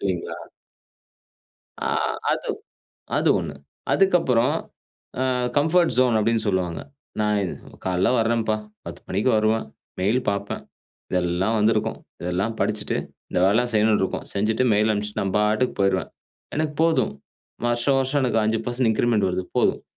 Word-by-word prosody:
இல்லைங்களா? 95 -3 -2 1.5
ஆ. - - -1 0.5
அது - - -3 0.7
அது - - +2
ஒண்ணு. 75 -3 -4 0.4
அதுக்கப்புறம் 165 -11 +3 0.7
அ, - - +2 0.3
கம்ஃபோர்ட் 160 +4 +3
ஜோன்னு 125 -3 +4
அப்டின்னு 115 0 +1
சொல்லுவாங்க 90 -4 -1 0.4
நான் 105 0 +2
இது 90 - -2 0.3
காலைல 90 0 +1
வரேன்ப்பா 115 -1 +1 0.3
10 - - -7
மணிக்கு 105 +7 +1
வருவேன் 110 +1 +1 0.3
மெயில் 105 +7 +2
பாப்பேன். 100 0 -2 0.5
இதெல்லாம் 90 +4 +1
வந்திருக்கும், 105 +1 +1 0.2
இதெல்லாம் 90 +6 -1
படிச்சிட்டு, 105 0 0 0.3
இந்த - - 0
வேலலாம் 120 +6 +3
செய்ணுன்னு 105 0 +3
இருக்கும் 95 - -2
செஞ்சுட்டு 110 +5 +1
மெயில் 105 +1 +3
அனுப்பிச்சுட்டு 105 0 -2
நான் 95 -1 -2
பாட்டுக்கு 105 +4 +1
போயிருவேன். 95 -1 +1 0.5
எனக்கு 155 -1 -1
போதும் 165 -1 +2 0.5
வருஷம் 120 +3 +2
வருஷம் 135 +2 +1
எனக்கு 115 -3 +2
5% 115 +2 0
இன்கிரிமண்ட் 110 -3 +2
வருது 90 0 -2
போதும். - - +2
110 Hz, 130 wpm, -23 LUFS, 100-120 Hz, 1.5 s, ஜோன்னு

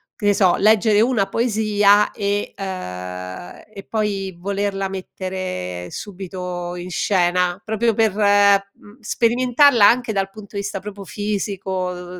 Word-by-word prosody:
che 210 - -6
ne 205 - +5
so, 185 -3 +3
leggere 215 0 +4
una 225 -5 +2
poesia 210 -2 +3
e 205 -1 -2
uhm, 90 - -6 0.3
e 195 -2 -10
poi 200 -4 -2
volerla 195 0 -2
mettere 185 - -5
subito 180 -2 -6
in 180 +1 -7
scena 180 0 +1
proprio 220 +1 0
per, 220 -1 +2
mhmm, 200 0 +2
sperimentarla 245 +2 +3
anche 240 -1 +2
dal 195 -1 -1
punto 205 0 -13
di 200 - -1
vista 200 -1 -4
proprio 200 0 -8
fisico, 185 -2 -4
200 Hz, 130 wpm, -20 LUFS, 185-210 Hz, 0.3 s, ne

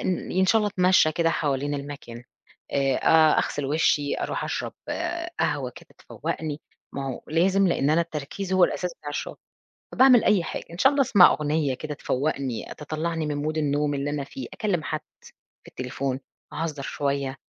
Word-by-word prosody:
إن 185 - -2
إن 190 +1 +3
شاء 225 - +5
الله 210 -1 +1
أتمشى 180 -3 +4
كده 165 +1 +1
حوالين 145 -2 -1
المكان، 140 -4 -7 0.5
آآ، 135 -1 +2
أ 160 -1 +5
أغسل 145 - -1
وشي، 145 0 +1
أروح - - -2
أشرب - - -3 0.7
قهوة - - 0
كده - - -14
تفوقني، 155 -2 -5 0.3
ما 135 -1 -4
هو 130 - -5
لازم 190 +5 +3
لإن 145 -3 +1
أنا 160 - +4
التركيز 170 +4 -4
هو 185 -1 +6
الأساس 180 -2 -2
بتاع 145 - -10
الشغل. 145 - -4 0.6
فباعمل 255 -3 +6
أي 200 -5 +3
حاجة، - - -5
إن 170 - -9
شاء 265 +7 +5
الله 285 -1 +2
أسمّع 205 -8 +7
أغنية 150 -1 0
كده 150 +3 -5
تفوقني، 135 -4 -2
تطلعني 160 +2 -3
من 145 -1 -2
mood 155 +1 -1
النوم 145 -1 +1
اللي 140 +1 -2
أنا 145 -1 -2
في، 265 - -8
أكلم 200 -8 -1
حد - - -2 0.7
في - - -14
التليفون، 130 +1 -3 0.3
أهزر 155 -2 -3
شوية. 140 -1 -2
150 Hz, 170 wpm, -25 LUFS, 140-175 Hz, 0.7 s, أسمّع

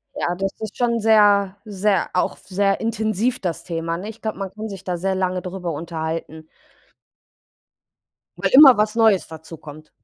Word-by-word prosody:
Ja, 175 - -2
das 195 +1 -2
ist 215 -2 -7
schon 235 -2 +1
sehr 205 -3 +4
sehr 205 -1 0
auch 180 - 0
sehr 195 0 -1
intensiv 225 +2 -1
das 175 -3 -4
Thema, 165 0 -3
nicht? 180 - -8
Ne, 210 - -6
ich 225 - -11
glaube, 220 -1 -4
man 195 -2 -5
kann 215 +2 -6
sich 195 -1 -9
da 180 -2 -3
sehr 190 +2 -1
lange 185 -1 -1
drüber 180 -1 -5
unterhalten. 160 0 -5 1.9
Weil - - -1
immer 270 -3 +9
was 215 +1 +1
Neues 220 -5 +3
dazukommt. 155 -1 -12
195 Hz, 165 wpm, -21 LUFS, 170-215 Hz, 1.9 s, immer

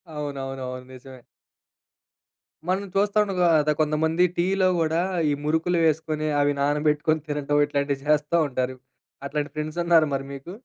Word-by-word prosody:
అవునవునవును 135 -3 -5
నిజమే. 130 0 -12 1.5
మనం 190 +2 0
చూస్తాండగా 200 -3 +2 0.2
ద - - +4
కొంతమంది 160 +3 +1
టీలో 185 +2 +2
కూడా 160 +1 +1 0.3
ఈ - - +1
మురుకులు 160 +3 +1
వేసుకొని, 155 0 0
అవి 145 0 +2
నానబెట్టుకొని 150 +2 +1
తినటం, 145 0 0
ఇట్లాంటివి 140 -1 -2
చేస్తా 150 +2 +2
ఉంటారు. 130 -1 -2 0.5
అట్లాంటి 145 0 -3
ఫ్రెండ్స్ 155 +2 -4
ఉన్నారా 165 -3 +4
మరి 135 0 -4
మీకు? 155 +8 -9
150 Hz, 125 wpm, -24 LUFS, 140-165 Hz, 1.5 s, ద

